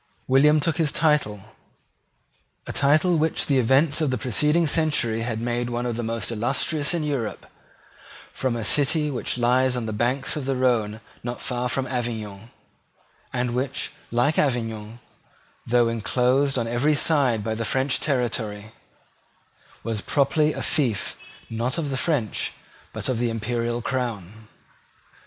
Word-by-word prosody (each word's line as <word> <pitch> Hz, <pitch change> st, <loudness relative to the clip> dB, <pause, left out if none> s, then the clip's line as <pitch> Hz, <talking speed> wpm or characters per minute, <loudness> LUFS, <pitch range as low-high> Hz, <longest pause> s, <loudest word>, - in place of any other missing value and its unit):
William 150 Hz, +4 st, +5 dB
took 155 Hz, +2 st, 0 dB
his 160 Hz, -4 st, +2 dB
title, 150 Hz, -12 st, +1 dB, 1.2 s
a -, -, -5 dB
title 155 Hz, +4 st, +3 dB
which 160 Hz, +1 st, 0 dB
the 140 Hz, -2 st, +2 dB
events 135 Hz, +6 st, +3 dB
of 155 Hz, -, +2 dB
the 130 Hz, -, 0 dB
preceding 150 Hz, +9 st, +2 dB
century 145 Hz, -8 st, +1 dB
had 115 Hz, -1 st, -2 dB
made 120 Hz, +1 st, -1 dB
one 120 Hz, 0 st, -2 dB
of 120 Hz, -2 st, -2 dB
the 120 Hz, -, -3 dB
most 115 Hz, -1 st, -2 dB
illustrious 140 Hz, +8 st, 0 dB
in 165 Hz, -, -1 dB
Europe, 140 Hz, -7 st, -3 dB, 0.9 s
from 130 Hz, -3 st, -1 dB
a 115 Hz, -2 st, -3 dB
city 150 Hz, -, +2 dB
which 125 Hz, -1 st, -3 dB
lies 125 Hz, +1 st, +2 dB
on 120 Hz, -, -2 dB
the 110 Hz, -, -3 dB
banks 125 Hz, +5 st, 0 dB
of 150 Hz, -3 st, -4 dB
the 135 Hz, 0 st, 0 dB
Rhone 115 Hz, -4 st, +1 dB, 0.2 s
not 120 Hz, 0 st, -4 dB
far 125 Hz, 0 st, -2 dB
from 130 Hz, +1 st, -1 dB
Avignon, 115 Hz, -4 st, -4 dB, 0.8 s
and 125 Hz, -1 st, -1 dB
which, 130 Hz, +2 st, -2 dB, 0.2 s
like 120 Hz, +6 st, +2 dB
Avignon, 115 Hz, -4 st, -1 dB, 0.7 s
though 120 Hz, 0 st, +4 dB
inclosed 125 Hz, +4 st, +1 dB
on 115 Hz, -2 st, -1 dB
every 125 Hz, +6 st, +2 dB
side 135 Hz, -8 st, +2 dB
by 110 Hz, +1 st, -1 dB
the 115 Hz, +1 st, -3 dB
French 130 Hz, +3 st, +1 dB
territory, 110 Hz, -6 st, -1 dB, 1.1 s
was 110 Hz, -2 st, -2 dB
properly 150 Hz, +4 st, +2 dB
a -, -, -5 dB
fief 125 Hz, -9 st, 0 dB, 0.3 s
not 115 Hz, +6 st, -2 dB
of 150 Hz, -4 st, -2 dB
the -, -, -1 dB
French 130 Hz, -, -1 dB, 0.4 s
but -, -, -5 dB
of 130 Hz, -3 st, 0 dB
the 120 Hz, -1 st, +1 dB
Imperial 115 Hz, +1 st, -2 dB
Crown. 110 Hz, -5 st, -4 dB
125 Hz, 150 wpm, -24 LUFS, 115-140 Hz, 1.2 s, William